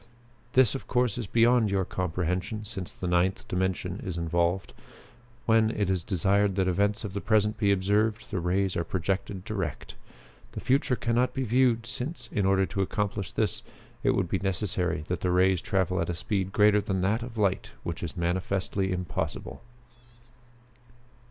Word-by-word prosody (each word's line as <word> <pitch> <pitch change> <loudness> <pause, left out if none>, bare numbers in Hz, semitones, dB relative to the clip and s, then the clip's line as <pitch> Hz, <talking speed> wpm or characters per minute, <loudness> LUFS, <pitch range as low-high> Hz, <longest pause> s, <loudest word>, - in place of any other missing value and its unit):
This, 130 -5 +5
of 135 - -6
course, 125 -4 +1
is 115 - -4
beyond 115 0 +4
your 95 -1 +1
comprehension, 90 +5 -2
since 100 -4 -6
the - - -7
Ninth 90 +2 +1
Dimension 90 0 -2
is 90 -3 -4
involved. 85 +2 0 0.7
When 110 -1 +4
it 105 -4 0
is 90 -3 0
desired 100 +3 +2
that 95 -1 +1
events 100 +4 +1
of 100 -3 -5
the 100 - -3
present 105 0 +2
be 100 -1 +3
observed, 105 +3 +1
the 95 - -1
rays 90 +2 0
are 85 - 0
projected 95 +2 -2
direct. 95 - -4 0.6
The - - -4
future 135 0 +2
can 115 -1 -1
not 125 +2 +2
be 135 - 0
viewed, 120 -1 +2
since, 125 +1 -5
in 100 -3 +1
order 95 0 +3
to 95 - -2
accomplish 100 -1 -2
this, - - 0 0.4
it - - +2
would 95 -3 +1
be 95 - -1
necessary 90 -4 -1
that 90 - -2
the 90 - 0
rays 90 0 +3
travel 95 -2 0
at 85 - -2
a 90 - -1
speed 95 +2 -2
greater 105 +1 +5
than 95 -2 -1
that 105 +5 +1
of 120 -1 -7
light, 100 -3 +1
which 85 -1 -4
is 85 +2 -5
manifestly 95 +2 -1
impossible." 90 -5 -3
95 Hz, 170 wpm, -28 LUFS, 90-110 Hz, 0.7 s, This